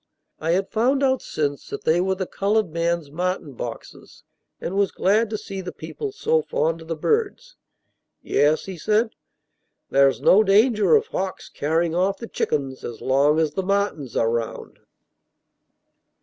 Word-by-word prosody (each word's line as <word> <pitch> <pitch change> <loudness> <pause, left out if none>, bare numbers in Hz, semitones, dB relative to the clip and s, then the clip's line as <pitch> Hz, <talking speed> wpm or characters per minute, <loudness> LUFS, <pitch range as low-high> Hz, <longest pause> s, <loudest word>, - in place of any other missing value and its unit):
I 165 +2 0
had 190 +2 -1
found 260 +5 +2
out 260 -1 +2
since 145 -2 -3
that - - -6
they 165 +3 +3
were 190 +1 0
the 190 0 -3
colored 200 -1 0
man's 170 -2 -1
martin 180 -2 -2
boxes, - - -9 0.4
and 185 - -4
was 200 -1 +2
glad 210 +4 +2
to 215 - -2
see 195 -2 -6
the 180 - -6
people 425 -2 -6
so 465 +3 +1
fond 165 - -1
of 160 - -12
the 165 - -2
birds. 450 - -1 0.7
"Yes," 150 +2 +2
he 190 -3 -7
said, 220 +5 +1 0.8
"there's 135 0 +4
no 210 +3 +5
danger 215 - +4
of 445 0 +3
hawks 190 - -4
carrying 160 +3 0
off 190 +3 +1
the 230 - -7
chickens 135 - -2
as 120 - -6
long 140 +3 +3
as 155 -2 +1
the 190 - -1
martins 195 - -1
are 115 0 +2
round." 115 -1 -4
185 Hz, 165 wpm, -23 LUFS, 155-215 Hz, 0.8 s, no